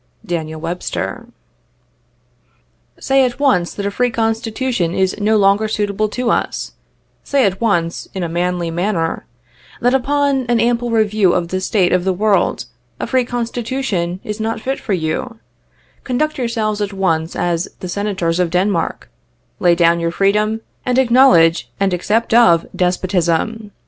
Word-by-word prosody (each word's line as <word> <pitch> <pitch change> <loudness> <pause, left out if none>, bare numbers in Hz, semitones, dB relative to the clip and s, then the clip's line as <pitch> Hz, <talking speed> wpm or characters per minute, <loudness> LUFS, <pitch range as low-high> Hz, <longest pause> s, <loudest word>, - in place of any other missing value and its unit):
[ - - -24
Daniel 160 -4 -4
Webster. 175 +3 -4 0.8
" - - -38
Say 270 0 +3
at 250 0 -1
once 185 -12 +2
that 200 - -4
a 200 - -1
free 245 +4 +1
Constitution 225 -4 -1
is 190 -1 +1
no 215 +1 +2
longer 200 +2 +3
suitable 210 0 -1
to 250 +2 -1
us; - - -2 0.5
say 275 -3 +2
at 195 +1 -1
once, 175 -7 0
in 190 - -2
a - - -1
manly 175 0 -1
manner, 170 -1 -2 0.5
that, 245 +1 +2
upon 275 0 +1
an 240 -1 +3
ample 240 +1 +1
review 215 -4 +2
of 170 -2 -1
the 185 +1 -2
state 185 -2 +1
of 180 -1 +2
the 190 0 +1
world, 210 +1 +1 0.3
a - - -2
free 255 -2 +1
Constitution 235 -6 -2
is 210 +1 -5
not 220 +1 -2
fit 265 +4 -3
for 205 - -3
you; 180 +8 -2 0.7
conduct 290 +4 -1
yourselves 220 -3 -1
at 205 -1 -2
once 165 -4 -1
as 170 0 -1
the 185 - -6
Senators 185 -3 -1
of 180 -2 +1
Denmark; 180 0 -1 0.5
lay 175 -2 +4
down 170 0 +3
your 170 0 0
freedom, 210 +4 +1 0.2
and 250 0 0
acknowledge 235 -10 +4
and 195 -2 +1
accept 215 +6 0
of 225 -9 +5
despotism. 185 +4 0
205 Hz, 155 wpm, -17 LUFS, 175-235 Hz, 0.8 s, of